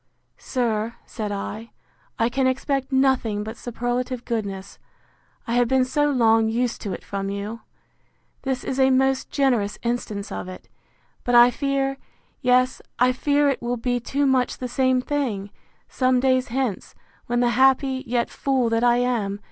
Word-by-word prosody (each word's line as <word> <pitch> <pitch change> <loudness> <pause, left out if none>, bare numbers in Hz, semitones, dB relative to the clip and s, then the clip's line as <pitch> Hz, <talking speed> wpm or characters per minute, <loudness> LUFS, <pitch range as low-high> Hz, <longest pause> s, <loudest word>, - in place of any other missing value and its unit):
Sir, 230 -3 -1
said 210 -2 -5
I, 215 +3 -5 0.5
I 230 - +2
can 260 +2 +1
expect 270 +1 -1
nothing 260 -6 +2
but 220 +2 -6
superlative 245 +1 -3
goodness, 200 -4 -4 0.7
I 230 - -3
have 245 0 +3
been 260 +1 +3
so 290 +3 +1
long 225 -4 +3
used 235 +1 -1
to 200 -4 -4
it - - -7
from 195 -1 -4
you. 200 +3 -5 0.8
This 265 -2 -2
is 265 - -3
a 265 0 +5
most 265 0 +2
generous 245 -8 +1
instance 220 -4 -3
of - - -5
it; 185 - -10 0.6
but 245 - +1
I 240 +1 +8
fear—yes, 270 -2 -1 0.2
I 250 +1 +4
fear 285 +3 +2
it 275 - 0
will 240 +1 -2
be 245 +1 -1
too 280 +4 -1
much 260 -2 +1
the 255 - -4
same 260 0 +2
thing, 240 -9 -2 0.4
some 255 -1 +2
days 255 0 +2
hence, 245 -4 -3 0.3
when 240 0 0
the 240 - +3
happy, 265 +2 +3
yet, 240 0 0
fool 260 -4 0
that 230 +1 +1
I 240 0 +4
am! 230 -5 -1
245 Hz, 160 wpm, -23 LUFS, 225-265 Hz, 0.8 s, I